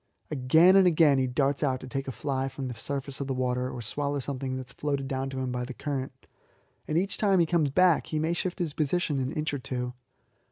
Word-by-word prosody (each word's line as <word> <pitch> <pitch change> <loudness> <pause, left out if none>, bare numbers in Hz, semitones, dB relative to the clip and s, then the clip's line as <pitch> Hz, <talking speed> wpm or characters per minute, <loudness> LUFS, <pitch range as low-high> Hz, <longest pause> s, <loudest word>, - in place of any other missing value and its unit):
Again 160 +7 +5
and 195 -2 +7
again 155 -5 +5
he 130 - +1
darts 135 +2 0
out 130 -3 +1
to - - -8
take 135 +2 -4
a - - -2
fly 135 0 -2
from 135 0 -5
the 125 - -4
surface 140 +3 -5
of 140 - -3
the 135 - -1
water 125 0 -1
or 125 -2 -6
swallow 145 +5 -2
something 135 -1 -3
that 130 - -6
is 125 - -16
floated 140 -2 -2
down 135 0 -2
to 135 - -6
him 130 -1 -2
by 125 0 -2
the 125 0 -7
current, 135 -2 -5 0.6
and 155 - 0
each 195 +3 0
time 200 -3 +3
that 175 - +5
he 165 - -4
comes 160 -5 +3
back 180 +3 +3
he 155 - -2
may 160 +2 +1
shift 180 +1 -2
his 170 -6 -2
position 155 -1 0
an 130 +1 -1
inch 155 0 -2
or 145 - -2
two. 125 -1 -4
135 Hz, 250 wpm, -28 LUFS, 130-155 Hz, 0.6 s, and